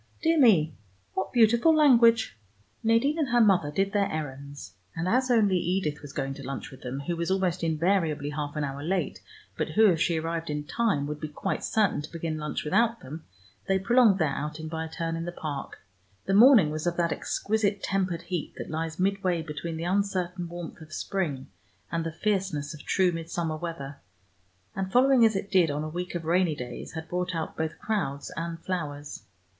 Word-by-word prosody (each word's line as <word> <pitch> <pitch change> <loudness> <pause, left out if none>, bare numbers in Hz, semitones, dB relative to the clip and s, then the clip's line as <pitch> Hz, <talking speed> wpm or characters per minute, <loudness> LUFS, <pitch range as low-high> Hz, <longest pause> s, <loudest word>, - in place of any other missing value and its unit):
Dear 325 -1 +3
me, 175 - +5 0.4
what 190 - -2
beautiful 235 +7 +5
language!" 235 - +5 0.5
Nadine 230 +8 +2
and 290 -4 0
her 240 0 +3
mother 190 -9 +4
did 195 +6 0
their 200 -1 +1
errands, 140 - -6 0.2
and 165 +2 -2
as 255 +5 +2
only 210 -6 +4
Edith 175 -3 -1
was 145 -1 -9
going 135 -1 -3
to 140 0 -10
lunch 135 0 -6
with 130 - -13
them, 130 +3 -5
who 170 +4 -2
was 170 +1 -2
almost 185 -2 0
invariably 160 -3 +1
half 145 0 -4
an 150 - -1
hour 140 0 -4
late, 180 +4 -2 0.4
but - - 0
who, 220 - +4
if 165 -2 -1
she 170 -2 +2
arrived 165 0 -3
in 150 0 -2
time, 170 -3 0
would 150 +1 -5
be 155 - -4
quite 150 - -3
certain 210 -8 +1
to 150 - -9
begin 165 -1 -3
lunch 150 0 -3
without 230 +9 +2
them, 155 +5 -9 0.4
they 195 - +3
prolonged 225 +1 +4
their 160 -6 +1
outing 150 +2 -4
by 160 0 -3
a - - -8
turn 165 0 -3
in 165 0 -4
the 175 - -4
Park. 150 -5 -6 0.5
The 195 - 0
morning 215 - +7
was 155 +2 -3
of 175 - -1
that 170 -1 +1
exquisite 205 -2 -1
tempered 185 -3 -1
heat 175 -4 -4
that - - -6
lies 160 0 -3
midway 185 -3 +1
between 160 +1 -5
the 165 - -4
uncertain 180 -2 -1
warmth 175 -1 -8
of 155 -1 -12
spring 155 -7 -2 0.5
and 165 -1 -1
the 165 - -3
fierceness 185 -5 -1
of 150 - -10
true 185 -2 +2
midsummer 165 -1 -3
weather, 155 -4 -6 0.8
and 190 0 -3
following, 255 +1 +5
as 220 -2 +4
it 195 +1 -3
did, 180 -4 +4
on 145 +1 -2
a - - -3
week 180 +2 -5
of 170 -2 -4
rainy 170 -1 +2
days 125 -3 -7
had 160 0 -6
brought 180 +1 -2
out 160 -1 -3
both 160 0 -3
crowds 165 -11 -2
and 165 +1 -4
flowers. 150 -6 -4
170 Hz, 200 wpm, -27 LUFS, 155-195 Hz, 0.8 s, morning